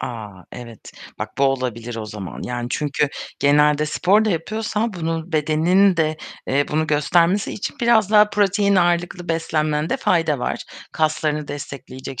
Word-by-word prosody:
A! 115 -3 -5 0.2
Evet. 115 -3 -10 0.3
Bak, - - -6
bu 140 - +4
olabilir 120 -3 -2
o 110 -1 -5
zaman. 105 -4 -7
Yani 120 -1 -4
çünkü 145 0 0 0.3
genelde 150 +1 +3
spor 195 +7 +3
da 215 - +1
yapıyorsan 215 +5 -2
bunun 165 -1 -4
bedenin 165 +5 +3
de, 155 -1 +1 0.3
eee, 140 +2 +2
bunu 155 +1 0
göstermesi 170 +6 +2
için 210 - -5
biraz 230 -4 +3
daha 210 -1 +6
protein 200 0 +2
ağırlıklı 175 0 0
beslenmende 155 -2 0
fayda 165 -5 +1
var - - -3 0.3
kaslarını 155 -1 -1
destekleyecek 135 -2 -7
155 Hz, 145 wpm, -21 LUFS, 140-180 Hz, 0.3 s, daha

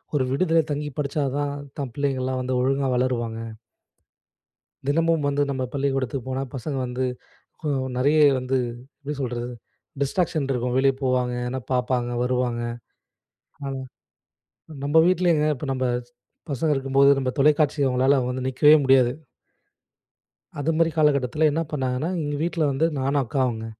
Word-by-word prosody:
ஒரு 140 - +2
விடிதில 165 +3 +3
தங்கிப் 145 -1 -4
படிச்சா 145 +1 -1
தான், 145 -1 -1 0.3
தன் 135 -4 -4
பிள்ளைங்கலாம் 130 -2 -1
வந்து 125 0 -1
ஒழுங்கா 135 +1 +1
வளருவாங்க. 120 -3 -1 1.5
தினமும் 165 +1 +2
வந்து 145 0 0
நம்ம 130 -1 -2
பள்ளிக்கூடத்துக்கு 135 -2 -1
போனா 130 +1 -2
பசங்க 135 +2 -4
வந்து 125 +1 -2 0.6
கொ 160 - -7 0.3
நெறைய 145 +5 +3 0.2
வந்து, 130 +1 -1 0.5
எப்டி 145 +1 -4
சொல்றது? 120 -2 -3 0.5
டிஸ்ட்ராக்ஷன் 155 0 0
இருக்கும். 125 0 -1
வெளிய 135 0 +4
போவாங்க, 125 -1 +1
எதுனா 130 +1 -3
பாப்பாங்க, 125 -1 0
வருவாங்க. 125 -1 0 1.0
ஆனா 135 - -3 1.1
நம்ம 145 +3 0
வீட்லேங்க, 175 -4 +3
இப்ப 145 - -6
நம்ம 130 -1 -1 0.2
ஸ் 120 - -30 0.4
பசங்க 145 +3 0
இருக்கும்போது 135 0 +3
நம்ம 130 -1 0
தொலைக்காட்சிய 150 0 +3
அவங்களால 130 +2 +3
வந்து 130 0 -3
நிக்கவே 145 +4 +6
முடியாது. 130 -2 +5 1.5
அது 150 +3 0
மாரி 165 0 +3
காலகட்டத்துல 150 0 +3
என்ன 160 +3 0
பண்ணாங்கன்னா 135 +3 -1
எங்க 145 -1 -2
வீட்ல 165 -3 0
வந்து 155 +5 +2
நானும் 135 +1 +1
அக்காவுங்க. 120 -2 -1
135 Hz, 135 wpm, -24 LUFS, 125-145 Hz, 1.5 s, நிக்கவே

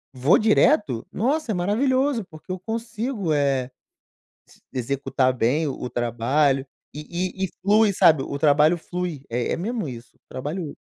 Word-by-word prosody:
vou 130 +6 +4
direto, 215 - +3
nossa, 265 - 0
é - - -1
maravilhoso, 255 +6 +1
porque 160 +1 -11
eu 185 - -4
consigo, 225 - -3
eh, 135 -3 0 0.8
s - - -22
executar 130 0 0
bem 130 +6 +1
o 130 -2 -4
trabalho 130 +4 +1 0.3
e 150 - -6 0.4
e - - +2
e - - -11
flui, 210 +2 +4
sabe. 155 -6 +5
O 140 +1 -5
trabalho 150 +3 +4
flui, 175 -4 -5
é 120 +1 -2
é - - -1
mesmo 215 - -3
isso, 120 -1 -10
trabalho 150 +4 -5
155 Hz, 150 wpm, -23 LUFS, 135-210 Hz, 0.8 s, sabe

